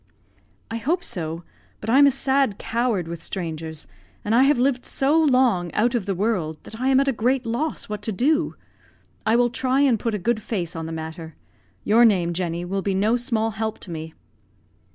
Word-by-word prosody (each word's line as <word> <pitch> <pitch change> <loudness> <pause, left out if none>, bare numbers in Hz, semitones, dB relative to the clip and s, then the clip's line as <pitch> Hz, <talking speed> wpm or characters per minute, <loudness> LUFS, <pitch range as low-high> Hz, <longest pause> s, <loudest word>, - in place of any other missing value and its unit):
"I 230 - -2
hope 335 +10 -1
so; 165 -5 -3 0.4
but 215 - -9
I'm 275 +5 +6
a - - +7
sad 270 -4 +1
coward 230 -7 -1
with 170 -1 -6
strangers, 160 -4 -4 0.4
and 210 - 0
I 240 - +5
have 290 0 +4
lived 250 0 +1
so 275 +3 +1
long 250 - +2
out 235 +4 +2
of 225 -5 -1
the 195 - 0
world 180 -6 -1
that 220 - -11
I 260 - +1
am 265 0 +5
at 275 - +1
a - - +4
great 250 +3 0
loss 245 +8 -2
what 210 -1 -5
to 220 - -2
do. 300 - +1 0.7
I 220 - +4
will 240 0 +3
try 260 +2 +1
and 255 -6 +3
put 230 -1 -1
a - - 0
good 220 +3 -1
face 185 -6 -3
on 160 0 -4
the - - -6
matter. 160 0 -7 0.5
Your 225 +3 +5
name, 180 -7 +3
Jenny, 170 0 -2
will 195 +2 -2
be 195 0 -1
no 210 +5 +2
small 230 -3 0
help 220 +1 -3
to 180 - -8
me." 160 -1 -7
220 Hz, 205 wpm, -23 LUFS, 175-255 Hz, 0.7 s, a